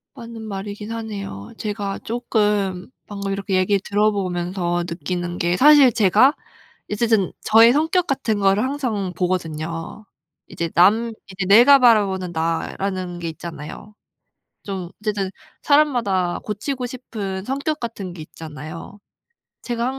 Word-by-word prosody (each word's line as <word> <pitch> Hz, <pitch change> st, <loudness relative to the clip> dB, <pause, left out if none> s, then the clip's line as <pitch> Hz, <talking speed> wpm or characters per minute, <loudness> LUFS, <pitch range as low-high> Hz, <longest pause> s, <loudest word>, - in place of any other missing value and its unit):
맞는 230 Hz, -2 st, -9 dB
말이긴 205 Hz, +1 st, -6 dB
하네요. 200 Hz, -, -6 dB
제가 205 Hz, -2 st, -4 dB
쪼끔 210 Hz, -5 st, -1 dB, 0.2 s
방금 200 Hz, -1 st, -4 dB
이렇게 195 Hz, 0 st, -2 dB
얘기를 190 Hz, +2 st, +2 dB
들어 210 Hz, +1 st, +2 dB
보면서 175 Hz, -2 st, -2 dB
느끼는 175 Hz, 0 st, -4 dB
게 175 Hz, +1 st, 0 dB
사실 285 Hz, -3 st, +7 dB
제가 220 Hz, +7 st, +5 dB, 0.6 s
어쨌든 215 Hz, -3 st, +1 dB
저의 225 Hz, +2 st, +6 dB
성격 325 Hz, +5 st, +1 dB
같은 235 Hz, -8 st, -1 dB
거를 195 Hz, +1 st, +3 dB
항상 245 Hz, -9 st, -2 dB
보거든요. 165 Hz, +1 st, -3 dB, 0.4 s
이제 170 Hz, 0 st, -4 dB
남 220 Hz, +7 st, +4 dB, 0.2 s
이제 185 Hz, -1 st, -3 dB
내가 240 Hz, +8 st, +8 dB
바라보는 200 Hz, -7 st, +3 dB
나라는 175 Hz, +2 st, -2 dB
게 170 Hz, -, -4 dB
있잖아요. 165 Hz, +4 st, -9 dB, 0.7 s
좀 190 Hz, -4 st, -5 dB
어쨌든 205 Hz, -3 st, -1 dB, 0.3 s
사람마다 235 Hz, -12 st, +2 dB
고치고 250 Hz, +5 st, -3 dB
싶은 205 Hz, -6 st, -6 dB
성격 280 Hz, +4 st, -2 dB
같은 205 Hz, -6 st, -5 dB
게 170 Hz, -, -9 dB
있잖아요. 155 Hz, +5 st, -9 dB, 0.7 s
제가 235 Hz, -1 st, -2 dB
200 Hz, 280 characters per minute, -21 LUFS, 180-230 Hz, 0.7 s, 내가